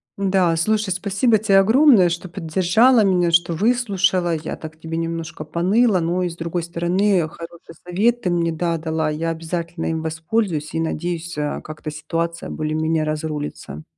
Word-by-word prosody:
М-да 190 -3 +2
слушай, 215 +5 0
спасибо 200 +5 +2
тебе 200 -2 +4
огромное, 220 - +5
что 175 +2 -4
поддержала 190 +8 +3
меня, 180 -3 +2
что 170 0 +3
выслушала. 190 -4 +1
Я 160 0 -5
так 160 0 -10
тебе 165 0 -5
немножко 165 -1 -4
поныла, 190 +7 +2
но 175 +2 0
и 180 - -1
с 170 - -9
другой 170 +1 -3
стороны 175 +2 +1
хороший 165 0 -11
совет 225 +7 +1
ты 180 - -1
мне 170 -1 +1
да 165 +1 -1
дала. 160 -1 -1
Я 160 +2 -2
обязательно 165 +1 -4
им 160 -1 -2
воспользуюсь 160 0 -2
и, - - -1
надеюсь, 170 +1 -3
а, 150 0 -2
как-то 155 0 -7
ситуация 165 +2 -4
более-менее 155 +1 -1
разрулится. 150 - -4
170 Hz, 160 wpm, -21 LUFS, 160-190 Hz, -, огромное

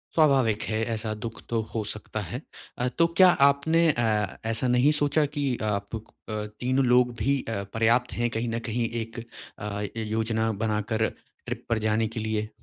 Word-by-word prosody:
स्वाभाविक 135 -9 +4
है 110 0 0
ऐसा 110 0 -2
दुःख 115 0 -6
तो 115 -1 +1
हो 110 -2 -1
सकता - - -5
है। - - -5 0.4
अ, 125 - 0
तो 165 0 +5
क्या 185 -1 +9 0.2
आपने 150 +4 +2
अ, 110 -5 0
ऐसा 115 +3 0
नहीं 125 +4 +4
सोचा 145 +1 +3
की 145 - +1 0.2
आप 100 +2 -2
अ, 110 - -6 0.6
तीनों 130 +1 +2
लोग 125 0 +4
भी 140 +4 +2
अ, 100 -3 -2
पर्याप्त 115 +2 +2
है 120 0 0
कहीं 115 +1 -1
न 115 +1 -1
कहीं 115 0 0
एक 115 +1 -7 0.4
अ, 100 0 -4
य 110 +2 -4
योजना 110 0 +1
बनाकर 110 +1 0 0.4
ट्रिप - - -5
पर 115 - +2
जाने 110 +1 +2
के 115 +1 -5
लिए? 110 0 -2
115 Hz, 180 wpm, -26 LUFS, 110-125 Hz, 0.6 s, क्या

